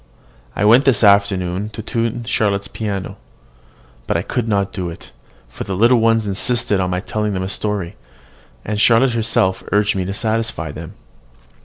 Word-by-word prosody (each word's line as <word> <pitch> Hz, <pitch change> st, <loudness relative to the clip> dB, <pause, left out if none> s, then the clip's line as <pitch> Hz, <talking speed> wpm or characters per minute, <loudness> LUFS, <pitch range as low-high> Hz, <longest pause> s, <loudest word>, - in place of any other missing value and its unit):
I 105 Hz, -, 0 dB
went 120 Hz, +6 st, +6 dB
this 125 Hz, -5 st, +3 dB
afternoon 100 Hz, -1 st, +2 dB
to 110 Hz, -, -6 dB
tune 115 Hz, +1 st, -2 dB
Charlotte's 100 Hz, -4 st, 0 dB
piano. 100 Hz, -2 st, -5 dB, 0.9 s
But -, -, +1 dB
I -, -, -2 dB
could 120 Hz, -3 st, -2 dB
not 100 Hz, -2 st, 0 dB
do 90 Hz, -2 st, -3 dB
it, 85 Hz, -, -11 dB, 0.4 s
for -, -, -7 dB
the 95 Hz, -, -4 dB
little 120 Hz, +5 st, +4 dB
ones 115 Hz, -1 st, +2 dB
insisted 105 Hz, +1 st, 0 dB
on 90 Hz, -1 st, 0 dB
my 90 Hz, 0 st, -2 dB
telling 105 Hz, 0 st, -2 dB
them 95 Hz, -, -2 dB
a 95 Hz, -, -4 dB
story; 105 Hz, -3 st, -3 dB, 0.7 s
and 105 Hz, 0 st, -1 dB
Charlotte 120 Hz, +3 st, +5 dB
herself 95 Hz, -5 st, +1 dB
urged 105 Hz, 0 st, +2 dB
me 95 Hz, -, -1 dB
to 95 Hz, -, -3 dB
satisfy 110 Hz, -8 st, -2 dB
them. 80 Hz, +2 st, -9 dB
105 Hz, 170 wpm, -19 LUFS, 95-115 Hz, 0.9 s, went